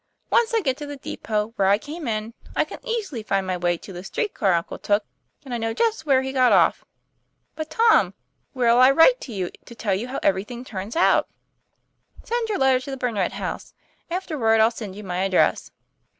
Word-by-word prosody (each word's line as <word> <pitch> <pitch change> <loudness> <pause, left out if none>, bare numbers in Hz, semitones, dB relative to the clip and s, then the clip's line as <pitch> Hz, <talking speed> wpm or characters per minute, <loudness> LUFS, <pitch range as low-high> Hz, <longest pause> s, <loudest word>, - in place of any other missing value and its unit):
Once 470 0 +3
I 455 -1 +2
get 265 -7 0
to 295 - -7
the 285 0 -7
depot 215 -4 -3
where 195 - +3
I 200 +1 +5
came 300 +4 -7
in, 220 0 -3 0.2
I - - +2
can - - -9
easily 420 - -3
find 195 -2 -1
my 185 -1 -1
way 175 -1 0
to 190 - -11
the 175 0 -8
street 420 - -3
car 195 -4 +2
uncle 170 -1 -2
took, 205 0 +1 0.4
and 255 - -6
I 240 - -2
know 225 0 -2
just 430 - 0
where 265 -2 +4
he 265 - -3
got 255 -2 +4
off." - - +4 0.7
'But, 315 0 -5
Tom, 450 +8 +3 0.4
where' 250 -3 +2
11 245 +2 +7
I 275 - +3
write - - +6
to 255 - -8
you, 190 -4 -3
to 235 - -12
tell 215 -3 -1
you 205 +6 -2
how 260 - -4
everything 215 +6 -1
turns 200 -1 -6
out? 340 - +3 0.3
" - - -49
' - - -23
Send 470 -1 -2
your 420 - 0
letter 265 -1 +3
to 255 - -9
the 270 - -4
Burnet 225 -7 -1
House; - - -6 0.3
afterward 305 -12 +1
I'll 220 +1 +5
send 215 -5 -7
you 210 - -9
my 180 -2 -4
address." 190 0 +2
240 Hz, 220 wpm, -23 LUFS, 205-300 Hz, 0.7 s, 11